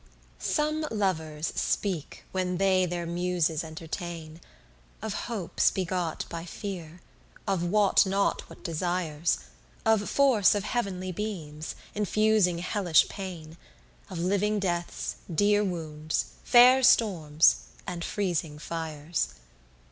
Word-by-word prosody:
6 -, -, -1 dB
Some 305 Hz, 0 st, 0 dB
lovers 160 Hz, -7 st, -1 dB
speak 185 Hz, -8 st, -2 dB
when 180 Hz, -1 st, -1 dB
they 185 Hz, -1 st, +3 dB
their 175 Hz, 0 st, -3 dB
Muses 170 Hz, -2 st, 0 dB
entertain, 160 Hz, 0 st, -7 dB, 0.6 s
Of 220 Hz, -1 st, -4 dB, 0.2 s
hopes 205 Hz, -8 st, +1 dB
begot 180 Hz, -3 st, -2 dB
by 165 Hz, -1 st, -6 dB
fear, 175 Hz, -2 st, -7 dB, 0.5 s
of 195 Hz, -3 st, +1 dB
wot 200 Hz, +3 st, +4 dB
not 195 Hz, +1 st, 0 dB
what -, -, -14 dB
desires: 170 Hz, -2 st, -1 dB, 0.5 s
Of 220 Hz, -2 st, +3 dB
force 255 Hz, -9 st, +4 dB
of 205 Hz, -, -1 dB
heav'nly 195 Hz, -5 st, -2 dB
beams, 165 Hz, -6 st, -5 dB, 0.2 s
infusing 210 Hz, -3 st, +2 dB
hellish 175 Hz, -1 st, +3 dB
pain: 170 Hz, -5 st, -7 dB, 0.5 s
Of 185 Hz, -, -6 dB
living 200 Hz, +4 st, +1 dB
deaths, 175 Hz, -3 st, -2 dB
dear 205 Hz, +4 st, +3 dB
wounds, 160 Hz, -4 st, -3 dB
fair 250 Hz, +2 st, +7 dB
storms, 165 Hz, -, +4 dB, 0.3 s
and 175 Hz, -2 st, -4 dB
freezing 170 Hz, -7 st, -2 dB
fires. 155 Hz, -, -3 dB
180 Hz, 110 wpm, -28 LUFS, 165-205 Hz, 0.6 s, fair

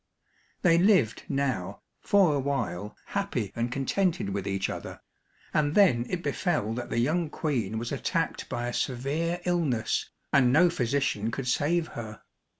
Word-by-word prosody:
They 170 Hz, -2 st, +5 dB
lived 175 Hz, -, +3 dB
now 135 Hz, -10 st, -2 dB, 0.2 s
for 195 Hz, -6 st, +4 dB
a 145 Hz, -, +1 dB
while 105 Hz, -9 st, -3 dB
happy 125 Hz, -, -2 dB
and 120 Hz, +1 st, -1 dB
contented 150 Hz, -, 0 dB
with 100 Hz, 0 st, -3 dB
each 95 Hz, -1 st, 0 dB
other, -, -, -6 dB, 0.5 s
and 150 Hz, 0 st, +1 dB
then 125 Hz, -, +4 dB
it 180 Hz, -1 st, -3 dB
befell 145 Hz, -, 0 dB
that 120 Hz, +1 st, -5 dB
the -, -, -2 dB
young 155 Hz, +7 st, +1 dB
Queen 120 Hz, -10 st, -2 dB
was 115 Hz, +1 st, -4 dB
attacked -, -, -2 dB
by 120 Hz, 0 st, -2 dB
a 120 Hz, -, -3 dB
severe 150 Hz, +7 st, -1 dB
illness, 150 Hz, -11 st, 0 dB, 0.2 s
and 130 Hz, -3 st, +5 dB
no 165 Hz, +5 st, +5 dB
physician 125 Hz, -6 st, 0 dB
could 125 Hz, +3 st, -4 dB
save 160 Hz, +6 st, +1 dB
her. 110 Hz, -2 st, -8 dB
135 Hz, 150 wpm, -28 LUFS, 115-165 Hz, 0.5 s, They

